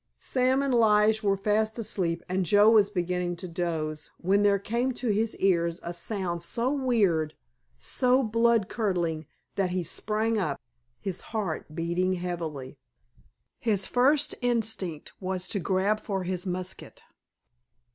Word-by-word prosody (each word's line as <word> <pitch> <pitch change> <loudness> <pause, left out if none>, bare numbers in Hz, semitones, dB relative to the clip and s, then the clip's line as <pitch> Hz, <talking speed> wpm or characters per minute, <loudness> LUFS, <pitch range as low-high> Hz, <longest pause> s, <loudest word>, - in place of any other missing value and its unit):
Sam 260 +1 +1
and 275 -2 0
Lige 220 -1 +4
were 200 -2 +2
fast 215 +3 0
asleep 175 -6 -1
and 185 +1 0
Joe 205 +3 +5
was 210 -3 +5
beginning 180 -2 -1
to 180 +2 -7
doze, 160 -3 -3
when 195 +3 +2
there 205 -1 +4
came 235 +6 -1
to 245 0 -3
his 215 +2 +1
ears 170 -3 +1
a 170 - -4
sound 175 -1 -2
so 235 +9 -1
weird, 210 - +1 0.4
so 255 - +2
blood 230 -2 +2
curdling 175 - -1 0.3
that 195 -2 +1
he 180 0 -1
sprang 220 +6 -1
up, 150 -8 -2 0.4
his 190 -3 -4 0.2
heart 160 -6 -3
beating 175 +3 0
heavily. 165 -7 -5 0.8
His 205 -5 0
first 275 +4 +3
instinct 220 -9 -1
was 185 -1 -3
to 200 - 0
grab 195 +3 +1
for 195 -3 -3
his 180 +1 -3
musket. 185 0 -6
195 Hz, 140 wpm, -27 LUFS, 175-220 Hz, 0.8 s, Joe